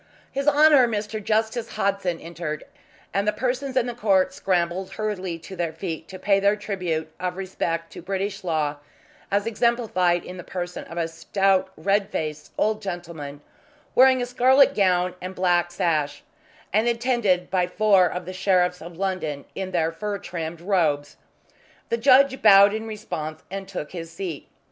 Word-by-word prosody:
His 275 +2 -3
Honour 295 -3 +6
Mr. 215 -1 -3
Justice 220 +2 0
Hodson 195 -4 -1
entered, 165 -2 -5 0.5
and 200 +1 0
the - - +4
persons 255 +4 -2
in 250 - +3
the 245 - -3
court 195 -5 +2
scrambled 185 0 -1
hurriedly 190 -5 -3
to 190 - -9
their 170 -2 -2
feet 165 -1 -5
to 190 - -9
pay 195 +1 +2
their 200 +1 +3
tribute 180 -7 -3
of 180 0 -3
respect 165 -3 -3
to - - -8
British 195 +2 -3
law, 155 -4 -1 0.5
as 200 +1 +1
exemplified 220 -7 +1
in 180 - -8
the 180 - -7
person 180 0 -5
of 170 - -10
a 165 -1 0
stout 190 +3 +1
red 200 0 +1
faced 155 -5 -4
old 215 0 +1
gentleman 170 -7 -6 0.5
wearing 260 0 +5
a - - -1
scarlet 260 +3 +5
gown 180 -4 +2
and 185 +1 -6
black 175 -2 +2
sash, 155 -4 -1 0.5
and 215 +3 +3
attended 235 -7 +1
by 180 -2 +2
four 195 -1 +4
of 180 0 -5
the 185 - -6
Sheriffs 180 -1 +1
of 170 +1 -10
London 185 -7 -2
in 190 -1 -4
their 165 -3 0
fur 205 +5 -4
trimmed 170 -3 -6
robes. 160 -7 0 0.7
The 230 - +1
judge 265 +2 +5
bowed 200 -1 +8
in 220 +1 -4
response 160 -8 -5
and 195 0 -5
took 185 -6 -6
his 165 -2 -7
seat. 165 -4 -6
190 Hz, 165 wpm, -24 LUFS, 170-215 Hz, 0.7 s, bowed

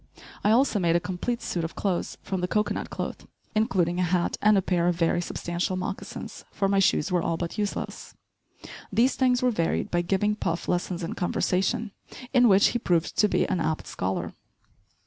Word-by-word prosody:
I - - +3
also 235 -1 +3
made 170 -2 +2
a - - +4
complete 185 +8 -3
suit 170 - -2
of 165 - -5
clothes 190 -4 -2
from 190 -2 -3
the 180 - 0
cocoanut 210 +3 -1
cloth, - - -5 0.3
including 185 -6 +1
a - - +2
hat 180 0 +1
and 210 0 +5
a - - +3
pair 175 -2 +1
of 175 - +2
very 170 0 +1
substantial 175 +1 -2
moccasins, 185 +1 -6
for 195 - 0
my 195 0 +2
shoes 185 -2 +2
were 180 -1 +2
all 165 0 -1
but 170 +4 -4
useless. 205 -1 -4 0.8
These 250 +3 +3
things 250 -1 +2
were 250 - +4
varied 165 -7 -1
by 175 - +2
giving 195 +4 +1
Puff 170 -4 -2
lessons 175 0 -1
in 165 - -3
conversation, 195 +3 0 0.4
in 250 -2 +6
which 195 0 +6
he 240 - -1
proved 175 -6 0
to 210 - +5
be - - +1
an 180 - 0
apt 160 -1 -1
scholar. 95 +1 -3
185 Hz, 190 wpm, -26 LUFS, 175-210 Hz, 0.8 s, in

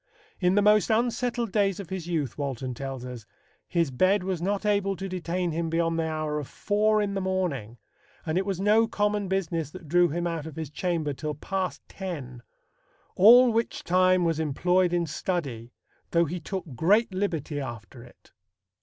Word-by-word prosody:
"In 180 0 +2
the 205 - +4
most 210 +1 +4
unsettled 235 0 0
days 195 -2 +1
of 190 -2 -8
his 185 -3 -4
youth," 155 -8 -2
Walton 130 -3 -3
tells 135 0 -6
us, 120 -4 -8 0.4
"his 170 -5 0
bed 185 +9 +2
was 185 -3 -2
not 200 +3 -1
able 200 -1 +1
to 195 +1 -5
detain 180 -1 -2
him 165 +1 -2
beyond 165 0 0
the 160 - 0
hour 155 -1 -2
of 145 - -6
four 215 +1 +1
in 200 -1 -2
the 195 - -2
morning; 170 - -2 0.5
and 160 - -1
it 190 - +2
was 195 -2 -3
no 215 +3 +4
common 210 -2 0
business 170 -5 -1
that 175 0 -11
drew 175 +3 +4
him 175 +3 -2
out 165 -3 -3
of 155 - -9
his 160 -3 -5
chamber 165 -3 -1
till 150 +2 -4
past 190 +5 -3
ten; 145 -11 -7 0.7
all 240 +5 +8
which 230 +1 -1
time 185 0 +3
was 165 -2 0
employed 175 +4 +2
in 175 -1 +1
study; 140 -8 -3 0.4
though 170 0 +3
he 175 +4 -4
took 190 +2 -5
great 200 - +3
liberty 165 -7 -2
after 120 -3 -7
it." 120 - -19
175 Hz, 180 wpm, -27 LUFS, 150-195 Hz, 0.7 s, all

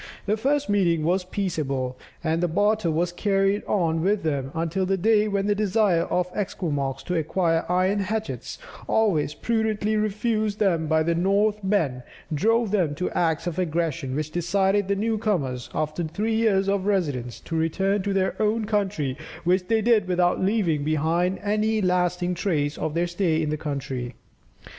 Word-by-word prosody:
The 210 - +1
first 285 +6 0
meeting 175 -6 +2
was 180 +4 +1
peaceable, 145 -10 -2 0.3
and 165 +1 0
barter 205 -2 +2
was 170 +2 0
carried 195 +2 +1
on 165 -5 +1
with 195 +2 +1
them 140 -4 -1
until 165 +3 -1
the 190 +1 +1
day 215 +2 +3
when 200 -1 0
the 205 - +2
desire 205 -4 +2
of 180 0 -1
the - - -3
Esquimaux 145 -9 -2
to 180 - -2
acquire 165 +1 0
iron 185 +3 +2
hatchets, 215 +3 -3 0.3
always 180 -10 +2
prudently 220 -2 0
refused 215 0 0
them 170 -7 +1
by 160 0 +2
the 170 +1 +1
Northmen, 195 -5 +1 0.3
drove 225 +7 +2
them 175 -8 +1
to 180 - -2
acts 165 -3 0
of 175 0 -3
aggression, 165 -5 -1
which 155 +1 -3
decided 190 +3 +1
the 200 - +1
new 220 +2 -1
comers, 140 - -1
after 155 +2 -2
three 205 +8 -2
years 210 -4 +2
of 195 0 0
residence, 145 -12 -1
to 165 - -5
return 190 +5 +1
to 200 +1 -2
their 190 -1 +1
own 215 +1 +1
country, 195 - -1 0.3
which 180 +1 +1
they 225 -1 +2
did 225 -4 +3
without 180 -1 +1
leaving 185 -8 +1
behind 160 +5 +1
them - - -17
any 215 +1 +1
lasting 180 -1 +1
trace 155 -5 -1
of 155 - -3
their 170 +1 +2
stay 175 -2 0
in 155 -2 -1
the - - 0
country. 135 -5 -4
185 Hz, 170 wpm, -24 LUFS, 160-205 Hz, 0.3 s, day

